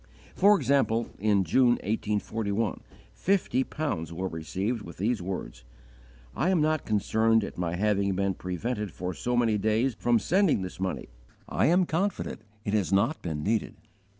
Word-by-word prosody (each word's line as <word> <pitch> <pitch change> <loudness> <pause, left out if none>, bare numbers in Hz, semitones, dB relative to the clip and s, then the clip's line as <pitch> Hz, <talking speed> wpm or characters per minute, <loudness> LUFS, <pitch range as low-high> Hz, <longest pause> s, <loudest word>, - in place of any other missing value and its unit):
For 205 +2 +5
example, 130 - +1
in 100 -1 +3
June, 120 +8 +4
1841, 105 0 -1 0.3
fifty 175 -9 +1
pounds 100 - -3
were 90 +3 -3
received 95 +8 -3
with - - -10
these 110 +1 0
words: 85 -10 -5 0.7
_"I 170 - +1
am 185 -3 +3
not 155 -1 +1
concerned 110 +1 +2
at - - -6
my 85 -1 -2
having 100 0 +1
been 100 0 0
prevented 105 +5 -3
for 90 0 -4
so 125 +8 -1
many 115 -3 +2
days 110 +5 +1
from 120 +2 +2
sending 175 - +2
this 90 - -7
money; 95 -8 -3 0.4
I - - +1
am 180 +3 +4
confident 180 - -2 0.2
it 100 - -1
has 105 -4 +1
not 115 +11 +2
been 75 -3 -4
needed." 110 +1 0
110 Hz, 155 wpm, -28 LUFS, 95-125 Hz, 0.7 s, For